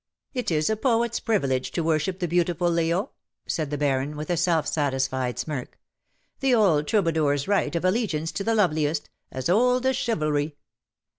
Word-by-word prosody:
" - - -54
It 250 -2 -2
is 155 -2 +1
a 220 - +2
poet^s 235 0 0
privilege 135 - 0
to 170 - -1
worship 160 +3 0
the 180 -2 -2
beautiful, 175 0 +1
Leo,^^ 170 +7 0 0.4
said 155 -3 -2
the 145 - -2
Baron, 145 +1 0
with 155 +4 -4
a - - +2
self 165 -2 +1
satisfied 130 -4 -1
smirk. 145 -5 -5 0.3
" - - -45
The 265 -2 +3
old 165 -10 +3
troubadour^s 160 -8 +1
right 200 -4 +1
of 170 - -1
allegiance 185 -6 0
to 200 - -3
the 225 +2 +1
loveliest 155 -6 +1
— - - -51
as 130 -1 -3
old 250 +7 +3
as 265 0 +2
chivalry." 155 -10 -1
165 Hz, 180 wpm, -25 LUFS, 150-205 Hz, 0.4 s, The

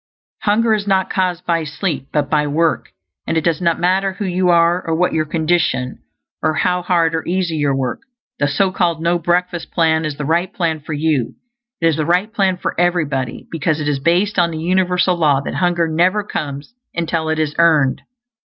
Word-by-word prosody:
Hunger 220 +2 +2
is 210 -1 -1
not 190 -1 +1
caused 180 -2 -1
by 170 -2 +1
sleep, 150 -3 -3
but 150 -2 0
by 150 0 +1
work. 160 +3 0 0.4
And 165 - 0
it 160 - 0
does 170 0 0
not 170 -2 +1
matter 190 +2 +1
who 200 +2 -5
you 180 0 +1
are, 170 +1 +3
or 165 - -1
what 180 +2 +1
your 155 -1 +1
condition, 160 -5 0 0.4
or 155 - +1
how 180 +2 +1
hard 170 -2 +1
or 160 - -1
easy 175 -2 -1
your 145 -2 +1
work, 130 -2 -2 0.4
the 145 - +2
so 185 +7 +1
called 175 -4 0
no 170 +1 +1
breakfast 175 0 -1
plan 160 -1 +2
is 150 -2 -4
the 150 - -4
right 170 +5 0
plan 165 -4 -1
for 150 +1 -7
you. 145 -5 0 0.5
It - - +1
is 160 -2 +3
the 155 - 0
right 185 +5 +1
plan 190 -4 +1
for - - -3
everybody, 150 -8 -1
because 160 -1 -1
it 150 - -3
is 145 -2 0
based 180 +7 +1
on 170 -1 +3
the 160 - -5
universal 180 +2 +1
law 150 -5 +3
that - - -5
hunger 170 +1 +1
never 180 +6 +2
comes 145 -1 -5 0.2
until 165 -1 -1
it 160 - 0
is 155 -2 -1
EARNED. 155 -6 +3
170 Hz, 205 wpm, -18 LUFS, 155-180 Hz, 0.5 s, are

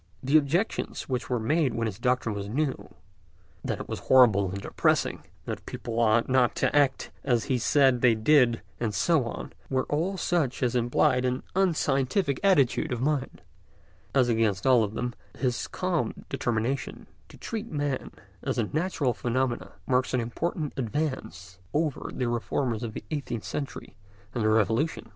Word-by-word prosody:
The 135 +4 +1
objections 155 +8 +1
which 130 -1 -3
were 125 -2 0
made 135 +2 +1
when 115 - 0
his 110 -2 -4
doctrine 125 -2 +1
was 100 0 -5
new—that 95 - -6
it - - -8
was - - -4
horrible 110 -7 +5
and 100 +2 -4
depressing, - - 0 0.2
that - - -5
people 115 -1 -4
ought 115 0 +3
not 130 -2 +3
to - - 0
act 140 -2 +2
as 120 -4 +2
he 130 -3 0
said 130 -1 +3
they 120 -3 +5
did, 120 0 +4 0.2
and 110 -4 -1
so 150 - +2
on—were 130 +2 -4
all 175 +6 0
such 160 -8 0
as 125 -1 +1
implied 125 +1 +2
an 125 0 -1
unscientific 150 -4 +1
attitude 155 -5 +3
of 125 - -1
mind; 135 0 -1 0.7
as 130 -3 +4
against 110 -5 +1
all 125 -3 +5
of 105 +1 -4
them, 125 0 -2 0.2
his 125 -3 -1
calm - - -2
determination 120 +3 -2 0.2
to - - -14
treat 225 0 -5
man 145 -3 -2 0.3
as - - -2
a 120 - +2
natural 150 - 0
phenomenon 120 +1 -1 0.2
marks 130 0 +1
an - - +2
important 150 +6 -3
advance 115 - -3 0.2
over 155 -2 -1
the 125 - -2
reformers 120 0 -1
of 115 -3 -5
the - - -6
eighteenth 135 -7 -3
century 140 -2 -6 0.4
and 120 - -1
the 110 - +3
Revolution. 110 +6 +1
125 Hz, 160 wpm, -27 LUFS, 115-145 Hz, 0.7 s, horrible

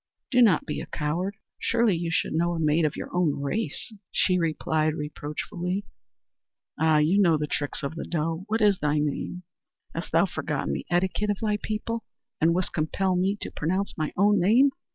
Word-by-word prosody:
"Do 250 -1 +5
not 205 -9 +5
be - - -3
a - - -7
coward! 175 +7 -2 0.2
Surely 230 -4 +2
you 170 0 -2
should 165 - 0
know 170 +2 +1
a - - -3
maid 155 +1 +3
of 150 - 0
your - - -6
own 170 -6 +2
race," 215 - -3 0.2
she 180 -1 +2
replied 155 -1 0
reproachfully. 170 +6 -4 0.9
"Ah, 160 -1 +4
you 165 +7 +4
know 170 -5 +4
the 150 - -1
tricks 145 0 -3
of 140 - -2
the 165 - -5
doe! 165 +2 -2
What 220 +1 0
is 205 -3 +4
thy 150 0 +1
name?" 150 +4 -2 0.5
"Hast - - -5
thou - - +4
forgotten 70 - -2
the - - -4
etiquette 190 +4 +1
of 205 - +1
thy 210 -1 0
people, 225 +1 -3 0.4
and 165 +1 +4
wouldst 185 0 -1
compel 180 +4 0
me 190 +3 +1
to - - -5
pronounce 185 +6 -1
my 155 -2 -2
own 205 +2 +4
name? 240 +10 +5
175 Hz, 190 wpm, -26 LUFS, 155-200 Hz, 0.9 s, Do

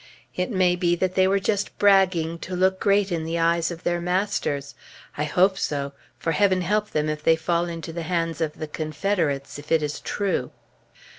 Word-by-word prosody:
It 180 - -1
may 185 -5 +2
be 175 -1 +1
that 185 +1 -1
they 185 0 +4
were 195 +1 +3
just 200 +1 -1
bragging 185 -5 +3
to 185 - -5
look 190 +1 +2
great 200 -1 +2
in 165 -2 -1
the 165 +1 -2
eyes 170 0 +2
of 170 -1 -8
their 175 0 0
masters; 180 -6 -1 0.4
I 150 - -1
hope 190 +5 +2
so, 140 -1 -2 0.3
for 165 - -1
Heaven 185 +1 +3
help 210 +4 0
them 150 0 -1
if 155 0 -2
they 160 +1 +4
fall 170 +1 0
into 165 -1 -6
the 170 - -4
hands 165 -1 -2
of 155 -2 0
the 155 - -4
Confederates, 155 -2 -2
if 150 +2 -12
it 160 -2 +3
is 150 0 -3
true. 190 -11 -2
170 Hz, 200 wpm, -24 LUFS, 160-190 Hz, 0.4 s, they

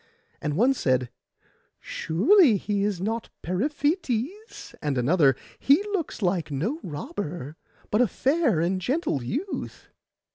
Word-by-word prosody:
And 150 0 -2
one 250 +6 +4
said, 130 - 0 0.7
'Surely 230 - +4
he 200 +1 -1
is 205 -3 -1
not 225 +4 -2
Periphetes;' 290 - -2
and 145 -3 -1
another, 135 +1 +4 0.2
'He 285 +8 +4
looks 330 - -3
like 175 -3 0
no 180 - -2
robber, 165 - -5 0.4
but 210 - +3
a 250 - +4
fair 270 - +1
and 185 +2 0
gentle 265 - 0
youth. 300 - -5
205 Hz, 120 wpm, -26 LUFS, -, 0.7 s, one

